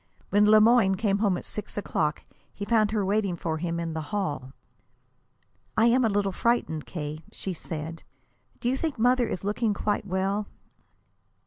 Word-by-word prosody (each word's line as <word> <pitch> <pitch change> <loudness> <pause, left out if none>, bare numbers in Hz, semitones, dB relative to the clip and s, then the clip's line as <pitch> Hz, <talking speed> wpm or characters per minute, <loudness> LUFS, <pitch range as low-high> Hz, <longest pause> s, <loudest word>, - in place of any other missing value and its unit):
When 205 +2 +5
Le 215 0 +8
Moyne 220 -3 +5
came 200 0 +1
home 200 -4 +2
at - - -8
six 210 0 -6
o'clock, 155 -7 -1 0.3
he 200 - -6
found 215 -1 +3
her 210 -2 0
waiting 200 -2 +1
for 160 -1 -3
him 170 0 -2
in 165 -1 -3
the 160 - -3
hall. 150 -10 -2 1.3
"I 220 - +5
am 240 +2 +4
just 230 - +3
a - - -2
little 200 -1 +1
frightened, 190 -8 0
K.," 155 -2 -5
she 190 - -4
said. 160 -1 -6 0.6
"Do 240 - -2
you 260 +2 +1
think 310 -2 -2
mother 245 +1 +3
is 185 - -4
looking 210 +1 0
quite 210 0 -1
well?" 195 +2 -1
200 Hz, 180 wpm, -27 LUFS, 170-220 Hz, 1.3 s, Le